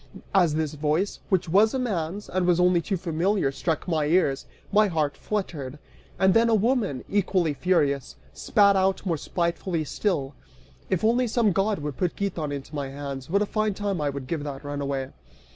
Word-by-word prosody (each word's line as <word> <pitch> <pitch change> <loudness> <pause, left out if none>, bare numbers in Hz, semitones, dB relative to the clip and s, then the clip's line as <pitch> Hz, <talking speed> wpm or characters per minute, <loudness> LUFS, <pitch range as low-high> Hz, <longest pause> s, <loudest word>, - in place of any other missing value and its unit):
As 175 -6 +4
this 155 -1 -1
voice, 155 +6 -1
which 185 -2 +1
was 205 +8 +4
a - - +1
man's, 200 -5 -2
and 185 -1 -1
was 175 -1 +3
only 180 -1 +4
too 195 +2 -2
familiar, 170 -1 0
struck 160 +5 -2
my 160 -4 +1
ears, 150 -5 +1 0.2
my 210 +1 +5
heart 155 -5 -1
fluttered. 150 -10 -4 0.4
And 190 +1 +4
then 230 +1 +4
a 225 - +4
woman, 215 - +1
equally 185 -5 +1
furious, 140 -5 0 0.2
spat 200 -2 +3
out 190 +1 +1
more 175 -3 +1
spitefully 170 +1 -2
still 145 -3 -1 0.6
"If 185 -1 0
only 240 +3 +3
some 225 -2 +2
god 195 +3 +1
would 145 -3 -4
put 180 -2 -1
Giton 175 -7 -2
into 140 +1 -6
my 140 -2 -3
hands, 140 -1 -6
what 200 +4 +2
a - - -1
fine 215 -1 -1
time 200 -5 -2
I 145 - +1
would 140 -1 -5
give 150 +2 -3
that 140 -1 -6
runaway." 140 -2 -3
175 Hz, 185 wpm, -25 LUFS, 145-200 Hz, 0.6 s, my